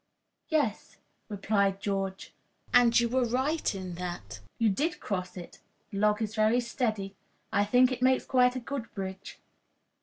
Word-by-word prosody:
"Yes," 290 - -1 0.3
replied 200 -1 +1
George, 195 -1 -3 0.4
"and 240 -1 +6
you 235 - +2
were 255 +2 +1
right 260 +3 0
in 185 -2 -6
that. 175 -1 -6 0.2
You 230 - +2
did 305 - -1
cross 185 -2 -4
it. 175 - -10 0.3
The 195 - -4
log 210 +1 +2
is 215 0 -4
very 220 +2 +3
steady. 220 -5 -2 0.4
I 205 -1 +3
think 250 +4 +4
it 250 -1 -4
makes 260 0 +3
quite 250 -1 +3
a - - -2
good 250 -1 -5
bridge." 190 -1 -6
220 Hz, 155 wpm, -29 LUFS, 195-250 Hz, 0.4 s, and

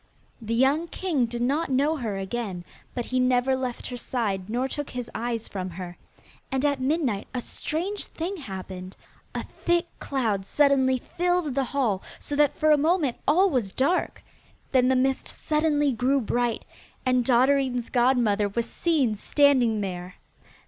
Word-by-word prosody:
The 225 +1 -2
young 275 +7 +3
king 315 -8 0
did 240 +1 -3
not 290 +6 +1
know 280 +4 +2
her 220 -7 -3
again, 195 -2 -4 0.3
but 245 -2 -2
he 255 - -1
never 255 +1 +3
left 255 -2 -4
her 250 - -5
side 210 -6 -2
nor 245 +4 0
took 290 +1 -4
his 250 -1 -6
eyes 230 -1 -3
from 185 -2 -4
her. 175 0 -7 0.6
And 265 +1 0
at 285 -2 +1
midnight 260 -7 0
a - - 0
strange 360 - -3
thing 360 +5 -4
happened. 190 - -7 0.4
A - - -2
thick 345 0 0
cloud 225 -8 -1
suddenly 275 -3 +3
filled 355 +1 -1
the 270 0 +1
hall, 235 -8 0 0.2
so 290 - -4
that 290 -1 +3
for 310 0 +3
a 300 - +6
moment 310 -4 +2
all 365 +7 +4
was 245 -8 0
dark. 280 - 0 0.5
Then 255 -2 +4
the 260 - +3
mist 265 +1 +1
suddenly 300 -2 +1
grew 255 +4 +2
bright, 240 0 -1 0.4
and 255 -1 +3
Dotterine's 255 0 +2
godmother 240 -5 +3
was 230 +3 -1
seen 280 -7 +1
standing 250 -4 +3
there. 180 -2 -5
255 Hz, 160 wpm, -26 LUFS, 230-290 Hz, 0.6 s, a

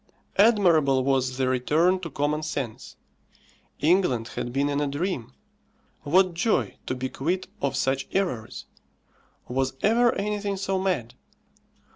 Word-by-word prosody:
Admirable 170 - +4
was 130 -1 0
the 130 -1 +1
return 155 +9 +2
to 170 -2 -6
common 145 +2 -1
sense. 140 -7 -5 0.9
England 150 -8 +2
had 120 - -4
been 140 +3 +1
in 145 0 0
a 145 - 0
dream. 145 - -3 0.7
What 180 +5 +3
joy 195 +7 0
to 130 - -1
be 130 +1 -3
quit 175 +8 -2 0.2
of 140 - 0
such 135 0 0
errors! 175 - -2 0.8
Was 130 +1 -1
ever 235 +3 +4
anything 205 -1 -2
so 190 0 -1
mad? 165 -12 -1
150 Hz, 130 wpm, -25 LUFS, 130-190 Hz, 0.9 s, Admirable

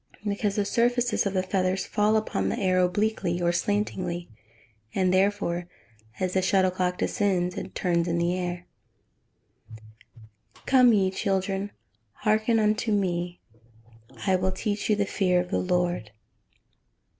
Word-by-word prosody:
_ - - -3
Because 200 0 -1
the 205 - +1
surfaces 240 0 +1
of 195 - -3
the 185 - +1
feathers 185 0 0
fall 210 +1 +2
upon 215 - -1
the - - -2
air 185 -4 +2
obliquely, 180 -1 0
or 175 -1 +2
slantingly, 180 -2 -2 0.7
and 185 -1 +2
therefore, 185 -3 +1 0.5
as 185 -1 -1
the 190 - +2
shuttlecock 185 -1 +1
descends, 185 -5 0
it - - -7
turns 175 -2 +1
in 170 0 0
the 170 +1 +1
air. 180 -1 -4 1.1
[Verse: 110 - -15 0.8
"Come 255 -2 +6
ye 190 -3 +2
children, 195 +1 -1 0.4
hearken 215 - +1
unto 215 +1 +1
me, 175 -3 -1 0.8
I 190 -2 +3
will 185 +1 0
teach 205 +3 -3
you 215 - +4
the 205 -1 0
fear 185 -2 +1
of 180 0 -3
the - - +1
Lord." 180 - 0
190 Hz, 145 wpm, -26 LUFS, 180-205 Hz, 1.1 s, Come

